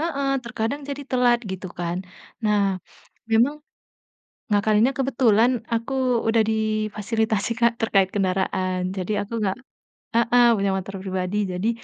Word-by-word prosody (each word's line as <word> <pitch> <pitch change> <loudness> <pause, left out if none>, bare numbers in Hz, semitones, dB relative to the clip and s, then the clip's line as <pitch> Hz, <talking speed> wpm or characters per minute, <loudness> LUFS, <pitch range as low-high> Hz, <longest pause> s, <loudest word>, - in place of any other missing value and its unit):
heeh, 280 -4 -1 0.2
terkadang 235 +3 -3
jadi 285 0 -4
telat, 245 -2 +3
gitu 190 0 -5
kan. 175 0 -2 0.5
Nah, 210 -1 +3 0.7
memang 235 +6 +4 1.0
ngakalinnya 210 +4 +3
kebetulan 245 -4 +3 0.2
aku 230 +3 -2 0.3
udah 225 0 +4
difasilitasi, 215 0 -1
Kak, 235 0 +4
terkait 195 -4 +3
kendaraan, 185 -1 0 0.2
jadi 190 +3 -2
aku 210 - -11
nggak 190 -2 0 0.6
heeh, 240 +1 +4
punya 200 0 +1
motor 195 +1 -5
pribadi, 185 +1 -2
jadi 180 +5 -1
215 Hz, 120 wpm, -23 LUFS, 195-235 Hz, 1.0 s, memang